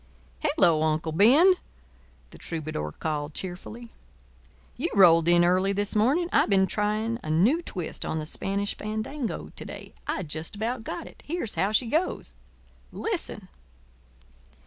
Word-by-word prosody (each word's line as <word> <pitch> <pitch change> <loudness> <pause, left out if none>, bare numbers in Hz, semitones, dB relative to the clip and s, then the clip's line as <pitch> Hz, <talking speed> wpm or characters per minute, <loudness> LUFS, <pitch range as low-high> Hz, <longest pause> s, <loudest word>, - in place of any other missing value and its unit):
"Hello, 165 -3 +3
Uncle 155 0 0
Ben," 260 - +6 0.8
the - - -13
troubadour 155 - -4
called, 150 -1 -3
cheerfully. 215 +6 -6 0.8
"You 330 +7 -2
rolled 165 -4 +6
in 175 0 +5
early 185 +3 +2
this 205 +1 -1
evening. 270 +12 +3
I - - +4
been 195 -2 +4
trying 215 +3 -1
a - - -7
new 210 - +3
twist 180 - -5
on 160 - -2
the 155 - -3
Spanish 200 +5 -2
Fandango 220 +5 -4
to - - -7
day. - - -9
I 185 - -1
just 155 +3 -5
about 225 +3 -3
got - - -5
it. - - -14
Here's 315 -8 -3
how 195 - 0
she 230 +3 +2
goes—listen." 320 - -4
200 Hz, 140 wpm, -26 LUFS, 165-230 Hz, 0.8 s, Ben